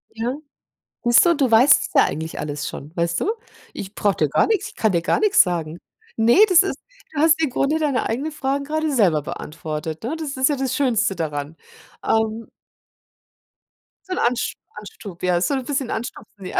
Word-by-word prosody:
Ja. 240 +4 -2 0.7
Siehst 240 +5 +5
du, 340 -1 +4
du 270 -4 +1
weißt 250 +5 +6
es - - -7
ja - - +6
eigentlich 160 +1 -4
alles 150 0 -4
schon, 150 +4 -9
weißt 170 0 -1
du? 425 - +1 0.4
Ich 195 +1 -8
brauche 205 -2 +1
dir 155 -3 +1
gar - - +3
nichts 420 -1 0
ich - - -18
kann 220 -3 +1
dir 170 -2 +1
gar 170 - +1
nichts 420 -1 +5
sagen. 170 -3 -2 0.4
Ne, 230 +7 +3
das 365 +1 +6
ist 390 - -3 0.4
du 290 - -3
hast 325 0 +4
im 305 - +1
Grunde 285 +5 0
deine 285 -5 0
eigenen 275 +8 -3
Fragen 280 -1 -2
gerade 310 0 -1
selber 180 - +3
beantwortet, 155 +2 -6
ne? 280 +8 -3
Das 295 -4 -5
ist 260 +2 +2
ja 290 - +1
das 265 -1 -2
Schönste 230 -8 +1
daran. 150 -1 -4 0.5
Ähm. 220 0 0 1.6
So 370 - -2
'n - - -7
Ansch 245 0 0 0.2
Anstup 200 -3 -11
ja, 180 -1 +2
ist 175 - +1
so - - -1
'n 260 -2 -3
bisschen 275 -3 -2
anstupsen, 215 -4 -7
ja. - - -1
230 Hz, 200 wpm, -21 LUFS, 175-285 Hz, 1.6 s, weißt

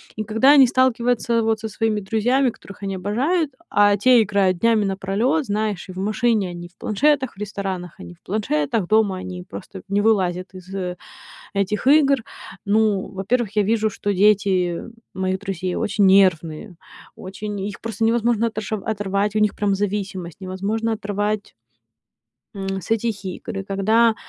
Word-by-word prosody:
И 215 - -3
когда 225 +6 +4
они 275 -3 +7
сталкиваются 240 -2 +1
вот 220 -1 +1
со 220 - -4
своими 215 0 -1
друзьями, 245 +6 +1
которых 200 -1 -14
они 195 - -2
обожают, 270 - 0 0.2
а 205 0 +4
те 245 +2 +5
играют 195 -3 +1
днями 230 -2 +3
напролёт, 195 +10 0
знаешь, 210 -2 -2
и - - -5
в - - -12
машине 215 0 +1
они 175 0 -8
в 175 - -26
планшетах, 265 +3 +1
в - - -27
ресторанах 195 -4 -5
они 175 - -10
в - - -38
планшетах, 185 -1 -1
дома 215 -3 +3
они 185 -1 -7
просто 190 -1 -9
не 200 +1 +1
вылазят 185 -4 +1
из 185 0 -12 0.8
этих 200 +5 -1
игр. 280 -1 +5 0.5
Ну, 205 -1 +2
во-первых, 205 +3 -1
я 210 - +3
вижу, 220 +1 +1
что 205 0 -2
дети 190 -3 +2 0.3
моих 190 0 -1
друзей 185 -3 -3
очень 205 -1 +1
нервные, 185 -1 +3 0.4
очень 205 +2 -6
их 205 0 -5
просто 225 0 -4
невозможно 230 0 +2
отош 215 -1 -5
оторвать, 205 0 -1
у - - +3
них 210 -1 +2
прям 205 -1 0
зависимость, 195 -4 -3
невозможно 200 +5 -2
оторвать 205 0 -2 1.0
м, 195 -1 -3
с 225 - -9
этих 225 -3 -1
игр. 195 +2 -5
И - - -5
когда 220 +4 +2
205 Hz, 160 wpm, -22 LUFS, 190-225 Hz, 1.0 s, они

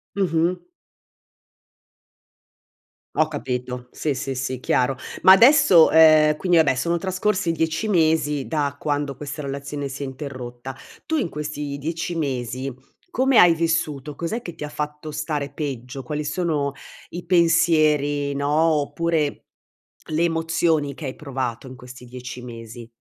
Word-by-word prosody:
Mh-mh. 175 -2 +1 2.6
Ho 155 0 +3
capito, 125 -3 -4
sì, 150 -2 -2
sì, 135 0 -4
sì, 130 0 -3
chiaro. 130 +1 +1 0.2
Ma 190 - +8
adesso, 230 - +7
ehm, 155 -1 +6
quindi 175 +2 +2
vabbè 140 -5 +4
sono 170 +7 0
trascorsi 185 0 -1
10 160 +6 -1
mesi 155 -6 +1
da 145 -3 -1
quando 145 -2 -2
questa 150 +2 -6
relazione 140 +1 -5
si 135 +1 -6
è - - -3
interrotta, 130 -2 -7 0.3
tu 320 - -1
in 245 - 0
questi 150 -1 -5
10 165 +3 -4
mesi 130 -2 -3 0.4
come 265 -5 +2
hai 175 -1 +7
vissuto? 155 -3 -1
Cos'è 170 +10 -3
che 175 -8 -8
ti 150 - -6
ha - - -7
fatto 150 +1 -5
stare 150 -1 -3
peggio? 135 -2 -5
Quali 150 +4 -4
sono 150 -4 -1 0.4
i 175 +1 -7
pensieri, 155 -5 +3
no, 140 +1 -1
oppure 160 0 0 0.6
le 160 +2 0
emozioni 165 -3 0
che 150 +2 -8
hai 130 - -5
provato 130 -4 -4
in 130 0 -10
questi 125 +1 -12
10 125 0 -8
mesi. 115 -1 -10
150 Hz, 140 wpm, -22 LUFS, 135-165 Hz, 2.6 s, Ma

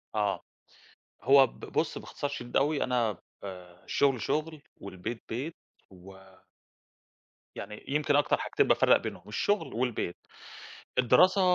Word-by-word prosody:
آه، 105 -2 0 0.8
هو 135 +2 +7
ب - - -17
بُص - - -2
باختصار 145 - -5
شديد 120 -3 -3
أوي، 145 +2 +2
أنا 120 -6 0 0.3
آآ، 90 -2 -10
الشغل 135 -4 +2
شغل، 155 +5 -2 0.2
والبيت 100 +4 -6
بيت 135 +8 -4 0.3
و 95 +1 -14 1.4
يعني 105 - -8
يمكن 145 0 +1
أكتر 145 - +3
حاجتين - - +1
بافرّق - - +5
بينهم، 95 - -7
الشغل 205 - 0
والبيت. 120 -7 -2 0.8
الدراسة 180 - +5
120 Hz, 120 wpm, -29 LUFS, 100-145 Hz, 1.4 s, هو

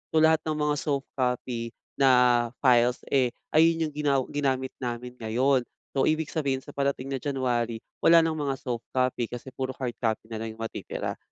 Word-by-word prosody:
So, 155 - +5
lahat 160 0 +5
ng 155 - 0
mga 150 -1 +1
soft 140 -3 -2
copy 125 -2 -2 0.2
na 125 -3 +5 0.2
files, 125 -1 +4
eh, 130 -3 +2 0.2
ayun 165 +1 +4
yung - - -16
ginaw 140 -2 +2
ginamit 135 -2 0
namin 125 0 -4
ngayon. 125 +3 +2 0.3
So, - - +4
ibig 155 0 +1
sabihin, 135 -4 -1
sa - - -11
parating 140 -1 -1
na 135 - -1
January, 120 -4 -1 0.2
wala 165 0 +7
ng 160 -1 0
mga 140 -2 -1
soft 120 -3 -4
copy 125 -2 +1
kasi 125 +2 -8
puro 130 0 -4
hard 120 -3 -4
copy 110 -1 -1
na 110 - -4
lang 110 0 -5
yung 115 - -11
matitira. 115 - -4
130 Hz, 185 wpm, -27 LUFS, 120-140 Hz, 0.3 s, wala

